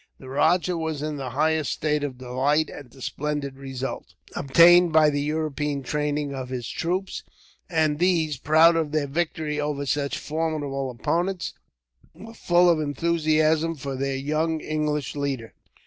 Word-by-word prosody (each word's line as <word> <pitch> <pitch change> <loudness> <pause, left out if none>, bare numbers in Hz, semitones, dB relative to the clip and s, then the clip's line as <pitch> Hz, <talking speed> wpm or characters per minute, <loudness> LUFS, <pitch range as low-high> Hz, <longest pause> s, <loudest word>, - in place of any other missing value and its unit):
The 130 - -11
rajah 170 +5 +2
was 160 -2 -3
in 155 -1 -3
the 135 -2 -4
highest 155 +3 +1
state 150 -1 -1
of 135 -3 -4
delight 135 +5 0
at 145 -4 -10
the 130 +1 -13
splendid 145 -2 -3
result, 135 -1 -6 0.2
obtained 170 +5 +6
by 155 -1 +5
the 145 0 -1
European 150 -2 -2
training 145 +1 -2
of 130 -2 -5
his 125 -3 -4
troops; 185 +3 -2 0.5
and 155 -3 +1
these, 165 -5 +2
proud 160 +5 +5
of 160 -2 -1
their 155 -2 +1
victory 155 0 -2
over 145 -1 -2
such 140 0 -1
formidable 150 -4 -2
opponents, 170 +9 -2 0.6
were 225 +1 -11
full 175 -4 +3
of 170 -2 +4
enthusiasm 155 +1 +1
for 135 -1 -5
their 135 +1 -2
young 155 +4 -1
English 150 -2 -2
leader. 135 -5 -3
150 Hz, 150 wpm, -25 LUFS, 140-160 Hz, 0.6 s, obtained